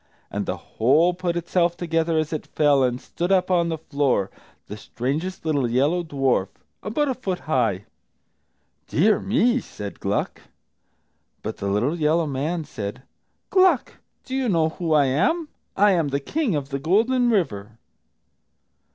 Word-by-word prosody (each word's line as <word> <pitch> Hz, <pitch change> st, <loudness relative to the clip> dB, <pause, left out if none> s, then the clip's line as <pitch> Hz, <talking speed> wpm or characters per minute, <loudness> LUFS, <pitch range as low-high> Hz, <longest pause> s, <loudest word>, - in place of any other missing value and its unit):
And -, -, -3 dB
the -, -, -2 dB
whole 150 Hz, +10 st, +2 dB
put 175 Hz, -1 st, -2 dB
itself 175 Hz, 0 st, 0 dB
together 165 Hz, -1 st, 0 dB
as 155 Hz, 0 st, -1 dB
it 155 Hz, -, -4 dB
fell, 145 Hz, -2 st, +3 dB
and 125 Hz, -1 st, +1 dB
stood 175 Hz, +7 st, -4 dB
up 185 Hz, -1 st, +2 dB
on 170 Hz, -2 st, +2 dB
the 160 Hz, -, -2 dB
floor, 140 Hz, -10 st, 0 dB, 0.3 s
the 105 Hz, -, -7 dB
strangest 145 Hz, -, -4 dB
little 145 Hz, -6 st, +1 dB
yellow 145 Hz, +9 st, +2 dB
dwarf, 135 Hz, -, 0 dB, 0.3 s
about 290 Hz, +8 st, -1 dB
a 265 Hz, -, +1 dB
foot 195 Hz, -8 st, -4 dB
high! 115 Hz, -, 0 dB, 1.0 s
"Dear, 205 Hz, +5 st, +3 dB
me!" 245 Hz, +3 st, +2 dB
said 100 Hz, -, -8 dB
Gluck. -, -, -2 dB, 1.0 s
But -, -, -4 dB
the 100 Hz, -, -4 dB
little 120 Hz, +12 st, 0 dB
yellow 160 Hz, +2 st, +2 dB
man 150 Hz, +4 st, -2 dB
said, 105 Hz, -5 st, -6 dB, 0.5 s
"Gluck, 370 Hz, -8 st, +3 dB, 0.3 s
do 260 Hz, -, -7 dB
you 265 Hz, -3 st, 0 dB
know 165 Hz, -4 st, +2 dB
who 165 Hz, 0 st, -4 dB
I 145 Hz, -2 st, +5 dB
am? 290 Hz, -, +1 dB, 0.3 s
I 205 Hz, +1 st, +5 dB
am 170 Hz, -5 st, +2 dB
the 140 Hz, 0 st, -1 dB
King 250 Hz, -, -1 dB
of 140 Hz, -2 st, -3 dB
the 140 Hz, -1 st, -3 dB
Golden 230 Hz, -, +2 dB
River." 115 Hz, -, -1 dB
160 Hz, 155 wpm, -23 LUFS, 135-185 Hz, 1.0 s, I